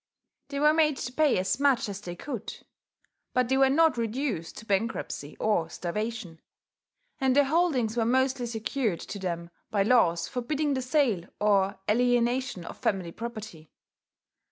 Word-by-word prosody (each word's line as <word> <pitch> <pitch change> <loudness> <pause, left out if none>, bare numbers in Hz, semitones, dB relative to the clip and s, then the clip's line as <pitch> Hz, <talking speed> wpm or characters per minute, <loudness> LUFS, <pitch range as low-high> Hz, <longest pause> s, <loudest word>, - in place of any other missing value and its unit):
They 280 - -4
were 300 +1 +5
made 305 -3 +3
to 250 - -5
pay 305 0 +3
as 190 +7 0
much 275 -5 +3
as 200 -1 -6
they 175 -3 -6
could; 240 +1 -7 0.7
but 250 -1 +2
they 265 - +3
were 270 0 +5
not 315 -2 +3
reduced 230 - -2
to 220 - -9
bankruptcy 195 -8 -2
or 210 -7 +1
starvation; 185 -2 -4 0.8
and 265 -2 +2
their 285 - +6
holdings 275 -7 +1
were 235 - +2
mostly 260 0 +1
secured 225 -3 -2
to 200 - -7
them 170 -2 -4 0.2
by 200 -2 +2
laws 175 -8 +3
forbidding 285 +4 -1
the 260 - -1
sale 250 - +1
or 200 -2 +2
alienation 245 -3 +1
of - - -9
family 185 -4 -1
property. 215 -8 -8
235 Hz, 155 wpm, -28 LUFS, 195-265 Hz, 0.8 s, their